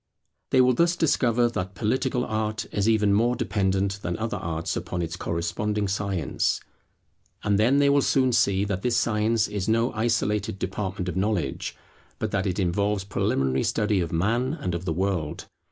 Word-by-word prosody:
They 130 Hz, -, +5 dB
will 125 Hz, 0 st, +4 dB
thus 170 Hz, +6 st, +2 dB
discover 125 Hz, -7 st, +2 dB
that 95 Hz, -4 st, -4 dB
Political 125 Hz, +5 st, 0 dB
Art 110 Hz, -1 st, -2 dB
is 100 Hz, +2 st, +1 dB
even 105 Hz, -2 st, +3 dB
more 120 Hz, +4 st, +3 dB
dependent 100 Hz, -1 st, 0 dB
than 85 Hz, -3 st, -3 dB
other 115 Hz, +2 st, -2 dB
arts, 80 Hz, 0 st, -3 dB
upon 90 Hz, -, -3 dB
its 80 Hz, 0 st, -4 dB
corresponding 105 Hz, +5 st, -2 dB
Science. 95 Hz, -6 st, -1 dB, 0.8 s
And 100 Hz, -1 st, +2 dB
then 125 Hz, +6 st, +4 dB
they 145 Hz, 0 st, +4 dB
will 140 Hz, 0 st, +4 dB
soon 130 Hz, -1 st, +2 dB
see 100 Hz, -4 st, +2 dB
that 100 Hz, -2 st, -2 dB
this 120 Hz, +1 st, +1 dB
science 110 Hz, -2 st, +1 dB
is 105 Hz, -1 st, -3 dB
no 115 Hz, +3 st, +2 dB
isolated 110 Hz, -2 st, 0 dB
department 95 Hz, -1 st, -3 dB
of 90 Hz, -, -3 dB
knowledge, 95 Hz, -8 st, -1 dB, 0.4 s
but -, -, -3 dB
that 95 Hz, 0 st, 0 dB
it 95 Hz, 0 st, -2 dB
involves 100 Hz, +2 st, 0 dB
preliminary 65 Hz, -9 st, 0 dB
study 105 Hz, -2 st, +1 dB
of 85 Hz, -1 st, -3 dB
Man 115 Hz, -, +1 dB
and 90 Hz, -, -3 dB
of 85 Hz, +1 st, -4 dB
the 80 Hz, -, 0 dB
World. 90 Hz, -4 st, -2 dB
105 Hz, 170 wpm, -25 LUFS, 95-115 Hz, 0.8 s, They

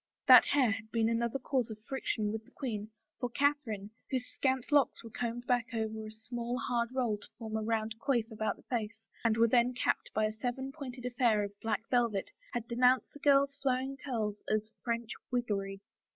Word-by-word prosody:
That -, -, +10 dB
hair 265 Hz, -6 st, +3 dB
had 220 Hz, 0 st, -4 dB
been 225 Hz, 0 st, +2 dB
another 235 Hz, +2 st, 0 dB
cause 255 Hz, -2 st, 0 dB
of 220 Hz, -, -6 dB
friction 225 Hz, -6 st, -1 dB
with 220 Hz, 0 st, -4 dB
the -, -, -21 dB
queen, 215 Hz, -6 st, -4 dB, 0.3 s
for 245 Hz, -, -1 dB
Catherine, 245 Hz, -7 st, 0 dB, 0.2 s
whose 255 Hz, -2 st, -1 dB
scant 260 Hz, 0 st, -1 dB
locks 285 Hz, -5 st, +3 dB
were 230 Hz, -, -9 dB
combed 240 Hz, +1 st, -3 dB
back 245 Hz, -2 st, +2 dB
over 220 Hz, -1 st, -2 dB
a -, -, -8 dB
small, 235 Hz, +2 st, -4 dB
hard 235 Hz, -3 st, 0 dB
roll 245 Hz, -5 st, 0 dB
to -, -, -13 dB
form 220 Hz, -2 st, -5 dB
a 220 Hz, -, 0 dB
round 220 Hz, 0 st, 0 dB
coif 245 Hz, -5 st, +1 dB
about 220 Hz, 0 st, -1 dB
the -, -, -20 dB
face 225 Hz, -2 st, -3 dB, 0.2 s
and 225 Hz, -1 st, +3 dB
were 230 Hz, 0 st, +6 dB
then 245 Hz, +1 st, +3 dB
capped -, -, 0 dB
by 215 Hz, -, +3 dB
a 215 Hz, -, 0 dB
seven 250 Hz, +4 st, -3 dB
pointed 260 Hz, -4 st, -7 dB
affair 240 Hz, -4 st, +2 dB
of 200 Hz, -, -4 dB
black 225 Hz, 0 st, -1 dB
velvet, 235 Hz, -6 st, +1 dB, 0.2 s
had 235 Hz, -1 st, -2 dB
denounced 250 Hz, +2 st, +3 dB
the 290 Hz, -, -11 dB
girl's 280 Hz, -1 st, +4 dB
flowing 265 Hz, -1 st, 0 dB
curls 225 Hz, -7 st, -3 dB
as 215 Hz, 0 st, 0 dB
" -, -, -51 dB
French 235 Hz, -1 st, -2 dB, 0.2 s
wiggery." 200 Hz, -5 st, -1 dB
235 Hz, 200 wpm, -32 LUFS, 220-255 Hz, 0.3 s, That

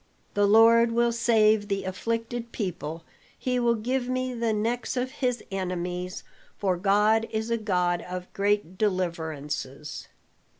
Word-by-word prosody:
The 205 Hz, 0 st, +3 dB
Lord 230 Hz, +2 st, +6 dB
will 235 Hz, 0 st, +3 dB
save 220 Hz, -3 st, +3 dB
the 200 Hz, -2 st, -1 dB
afflicted 230 Hz, +5 st, -3 dB
people, 165 Hz, -5 st, -4 dB, 0.3 s
he 250 Hz, -1 st, -1 dB
will 235 Hz, -1 st, +3 dB
give 245 Hz, +3 st, -1 dB
me 255 Hz, 0 st, -1 dB
the 230 Hz, -1 st, 0 dB
necks 230 Hz, +4 st, -1 dB
of 255 Hz, +1 st, -1 dB
his 250 Hz, -4 st, -1 dB
enemies, 180 Hz, -1 st, -3 dB, 0.3 s
for 190 Hz, -3 st, +1 dB
God 210 Hz, +4 st, +3 dB
is 220 Hz, +1 st, -3 dB
a -, -, +3 dB
God 180 Hz, -4 st, +1 dB
of 180 Hz, 0 st, -6 dB
great 200 Hz, -3 st, 0 dB
deliverances." 155 Hz, -7 st, -3 dB
210 Hz, 135 wpm, -27 LUFS, 180-230 Hz, 0.3 s, Lord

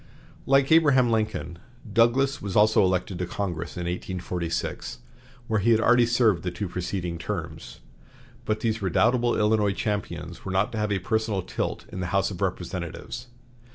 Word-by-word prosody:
Like 135 Hz, +1 st, +4 dB
Abraham 140 Hz, -7 st, +5 dB
Lincoln, 110 Hz, -7 st, -2 dB, 0.3 s
Douglas 130 Hz, +5 st, +3 dB
was 100 Hz, -3 st, -4 dB
also 105 Hz, 0 st, +5 dB
elected 90 Hz, 0 st, 0 dB
to 90 Hz, -, -2 dB
Congress 90 Hz, -4 st, -4 dB
in -, -, -3 dB
1846, 90 Hz, -1 st, -3 dB, 0.5 s
where 110 Hz, -2 st, 0 dB
he 105 Hz, +4 st, +1 dB
had 115 Hz, -1 st, +5 dB
already 120 Hz, +1 st, +4 dB
served 115 Hz, -7 st, +3 dB
the 90 Hz, -, -2 dB
two 90 Hz, +3 st, -4 dB
preceding 90 Hz, -1 st, -4 dB
terms. 80 Hz, -, -6 dB, 0.6 s
But 110 Hz, -2 st, -1 dB
these 110 Hz, -1 st, -1 dB
redoubtable 115 Hz, +6 st, +2 dB
Illinois 105 Hz, -1 st, +2 dB
champions 85 Hz, -5 st, -4 dB
were 95 Hz, -, -4 dB
not 95 Hz, +2 st, +1 dB
to 110 Hz, -, -3 dB
have 105 Hz, -1 st, -1 dB
a 100 Hz, -, +2 dB
personal 105 Hz, 0 st, -1 dB
tilt -, -, -3 dB
in 95 Hz, -, -6 dB
the 90 Hz, -, -2 dB
House -, -, +1 dB
of -, -, -8 dB
Representatives. 95 Hz, +8 st, -4 dB
105 Hz, 160 wpm, -26 LUFS, 90-115 Hz, 0.6 s, Abraham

